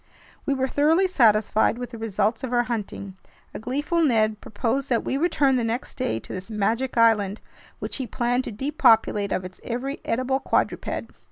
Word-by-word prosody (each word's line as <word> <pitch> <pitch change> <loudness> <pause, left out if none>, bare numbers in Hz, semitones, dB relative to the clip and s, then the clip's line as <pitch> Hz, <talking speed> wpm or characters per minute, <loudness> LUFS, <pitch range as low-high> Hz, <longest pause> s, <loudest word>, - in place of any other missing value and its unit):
We 280 - +2
were 265 0 0
thoroughly 315 +8 +3
satisfied 220 - +3
with 245 -1 -6
the 230 - -8
results 220 +1 -1
of 255 - -3
our 240 -1 +3
hunting. 205 -5 -5 0.4
A - - -6
gleeful 290 - -1
Ned 220 -7 +2
proposed 265 +5 -2
that 235 -3 +1
we - - -2
return 280 -4 +2
the 240 - 0
next 230 +3 -3
day 250 - -1
to - - -9
this 185 +3 -7
magic 225 +4 -1
island, 215 -3 +3 0.4
which - - -4
he 260 -3 -4
planned 245 +3 0
to - - -4
depopulate 225 -4 +2
of 185 - -1
its 185 0 -11
every 260 +4 -4
edible 255 +3 0
quadruped. - - -1
240 Hz, 180 wpm, -24 LUFS, 215-265 Hz, 0.4 s, thoroughly